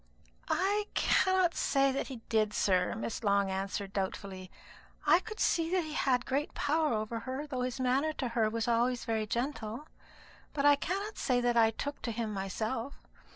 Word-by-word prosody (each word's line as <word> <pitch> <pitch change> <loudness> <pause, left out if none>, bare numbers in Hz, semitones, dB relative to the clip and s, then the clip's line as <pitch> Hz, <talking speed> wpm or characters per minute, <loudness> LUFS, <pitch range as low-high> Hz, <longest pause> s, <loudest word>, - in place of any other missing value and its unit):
"I 410 +2 +1
cannot 375 -2 +3
say 275 -1 +2
that 270 - -2
he 255 -4 -8
did, 215 -2 +1
sir," 185 -2 +2
Miss 225 +1 -4
Long 200 -2 +2
answered 195 +1 -3
doubtfully. 190 -1 -4 0.6
"I - - +6
could 435 +2 -9
see 330 -1 +2
that 365 0 +1
he 310 -1 -6
had 250 -5 +1
great 280 +3 -1
power 305 +1 +1
over 220 +1 -2
her, 260 +5 -4
though 265 -4 -3
his 250 +1 -2
manner 260 +4 +2
to 260 -4 -3
her 230 -2 +1
was 225 +1 -2
always 240 +1 +1
very 220 -1 -1
gentle; 240 +1 -3 0.7
but 285 -2 0
I 290 0 +8
cannot 395 +8 -3
say 250 -3 +2
that 240 0 +1
I 225 -1 +6
took 280 +6 -5
to 235 - -3
him 225 -1 -3
myself. 220 +6 -3
245 Hz, 180 wpm, -31 LUFS, 215-290 Hz, 0.7 s, I